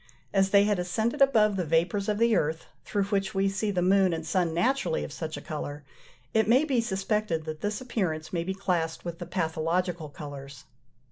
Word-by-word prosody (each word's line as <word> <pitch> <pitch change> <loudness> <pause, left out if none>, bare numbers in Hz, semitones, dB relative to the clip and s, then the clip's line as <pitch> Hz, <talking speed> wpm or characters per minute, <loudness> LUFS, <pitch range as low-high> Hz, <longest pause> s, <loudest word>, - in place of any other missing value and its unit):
As 195 -1 +3
they 200 0 +6
had 205 -2 +1
ascended 220 +8 -1
above 220 -7 +5
the 180 - 0
vapours 170 +6 +1
of 210 - +1
the 230 0 +3
earth, 160 -2 0 0.2
through 205 -1 0
which 195 -1 -1
we 195 0 +2
see 195 +2 -1
the 180 -3 0
moon 190 -1 +4
and 160 -1 -4
sun 175 0 +1
naturally 180 0 +1
of - - -6
such 155 -1 -5
a - - -7
colour, 145 -1 -6 0.5
it 220 -2 +3
may 255 +5 +5
be 260 -6 +2
suspected 195 -5 -1
that 155 -1 -6
this 210 +3 -2
appearance 170 -11 -2
may 170 -2 0
be 190 +2 -3
classed 175 -5 -1
with 170 -1 -5
the - - -6
pathological 165 0 -1
colours. 140 -2 -9
185 Hz, 200 wpm, -28 LUFS, 160-210 Hz, 0.5 s, they